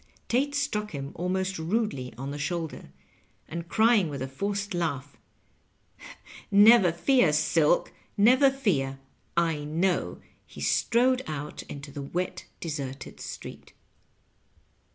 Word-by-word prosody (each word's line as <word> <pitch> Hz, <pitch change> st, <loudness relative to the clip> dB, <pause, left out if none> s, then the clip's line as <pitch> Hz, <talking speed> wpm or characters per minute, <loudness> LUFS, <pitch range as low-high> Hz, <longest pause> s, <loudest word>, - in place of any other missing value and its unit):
Tate 280 Hz, +4 st, +1 dB
stmck 210 Hz, -7 st, -1 dB
him 140 Hz, -4 st, -6 dB
almost 185 Hz, +1 st, -2 dB
rudely 165 Hz, -, -1 dB
on 135 Hz, +2 st, -5 dB
the 145 Hz, -, -6 dB
shoul 170 Hz, +3 st, -1 dB
der, -, -, -12 dB, 0.6 s
and 170 Hz, +1 st, -6 dB
crying 220 Hz, -6 st, +4 dB
with 140 Hz, -3 st, -4 dB
a -, -, -3 dB
forced 200 Hz, +8 st, -3 dB
laugh, 145 Hz, -6 st, -2 dB, 0.7 s
" -, -, -42 dB, 0.6 s
Never 205 Hz, -2 st, +7 dB
fear, 185 Hz, -, +3 dB
Silk, 155 Hz, +2 st, +2 dB, 0.2 s
never 255 Hz, +7 st, +6 dB
fear 160 Hz, -, -1 dB, 0.4 s
I 165 Hz, -2 st, +2 dB
I 145 Hz, -, -6 dB
know," 170 Hz, +5 st, 0 dB, 0.4 s
be -, -, -9 dB
strode 255 Hz, +2 st, +2 dB
out 150 Hz, -1 st, -5 dB
into 140 Hz, 0 st, -8 dB
tbe 140 Hz, -1 st, -8 dB
wet, 180 Hz, +1 st, -2 dB
deserted 140 Hz, -5 st, -6 dB
street. -, -, -9 dB
170 Hz, 130 wpm, -27 LUFS, 145-210 Hz, 0.7 s, Never